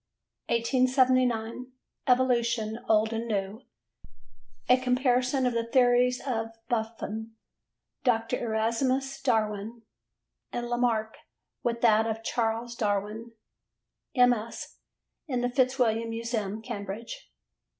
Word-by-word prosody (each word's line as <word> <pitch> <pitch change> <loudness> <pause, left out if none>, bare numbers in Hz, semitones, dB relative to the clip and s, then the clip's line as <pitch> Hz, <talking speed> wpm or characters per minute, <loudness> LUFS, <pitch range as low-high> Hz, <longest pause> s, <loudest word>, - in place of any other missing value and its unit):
1879. 255 -1 +2 0.3
Evolution 235 -3 +2
Old 220 +1 +3
and 225 +1 -3
New: 205 +1 -2 1.1
A 250 - +6
comparison 255 +1 +2
of 250 - +1
the 230 0 -1
theories 250 0 +4
of 225 -4 -1 0.2
Buffon, 225 -1 -3 0.7
Dr. 235 -1 +1
Erasmus 255 +5 0
Darwin 220 -2 -1 0.7
and 240 0 -3
Lamarck 235 -3 0 0.4
with 235 -1 -1
that 225 -1 +4
of 225 0 -3
Charles 230 +1 -1
Darwin: 210 +2 -2 0.8
MS. 245 -3 +1 0.5
in 250 -4 -1
the 245 - +1
Fitzwilliam 245 -3 +2
Museum, 225 -2 -3
Cambridge. 225 - -6
235 Hz, 95 wpm, -28 LUFS, 220-250 Hz, 1.1 s, A